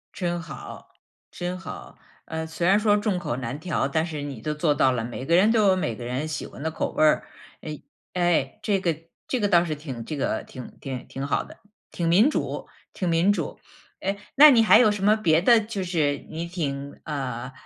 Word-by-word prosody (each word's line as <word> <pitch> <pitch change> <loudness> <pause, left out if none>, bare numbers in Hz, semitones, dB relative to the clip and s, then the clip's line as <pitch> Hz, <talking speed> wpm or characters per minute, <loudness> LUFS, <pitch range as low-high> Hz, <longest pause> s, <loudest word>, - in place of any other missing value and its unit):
真 175 -3 -2
好， 160 -2 -10 0.4
真 180 +1 -5
好。 190 - -9 0.3
呃， 160 0 -5
虽 165 +1 -3
然 195 +3 +5
说 210 -1 +3
众 205 -3 0
口 150 -8 -3
难 130 +2 -5
调， 170 -4 -1
但 160 +3 +1
是 155 -4 -5
你 140 -6 -6
都 150 - -2
做 150 0 +1
到 135 -3 +3
了， 120 -2 -2
每 120 +2 -6
个 170 - +3
人 200 +5 +5
都 220 -3 +4
有 190 - +5
每 175 -11 -1
个 120 +2 -8
人 125 +5 -2
喜 155 -1 -4
欢 135 - -10
的 160 - -1
口 - - -2
味 - - +2
儿。 155 - +3 0.3
哎， 155 -1 -7 0.3
哎， 175 +2 +1
这 200 -2 +1
个 170 -4 0 0.3
这 255 - -1
个 205 - +2
倒 175 -1 +5
是 155 -2 -2
挺 135 -6 -7
这 155 - -4
个 140 - -1
挺 125 -2 -11
挺 130 -2 -6
挺 135 +1 -4
好 - - 0
的， - - -14 0.3
挺 170 - -2
民 195 - +5
主 - - -3 0.3
挺 180 - -2
民 170 +5 +3
主。 - - -4 0.4
哎， 195 +1 -2 0.2
那 295 +2 +10
你 230 -4 +5
还 220 - +7
有 235 -3 +6
什 205 -2 -2
么 210 +2 +5
别 165 -6 +3
的 235 +4 +6
就 210 -2 -4
是 155 -6 0
你 160 +2 -4
挺 140 -5 -4
呃， 135 -5 -4
165 Hz, 235 characters per minute, -25 LUFS, 145-195 Hz, 0.4 s, 那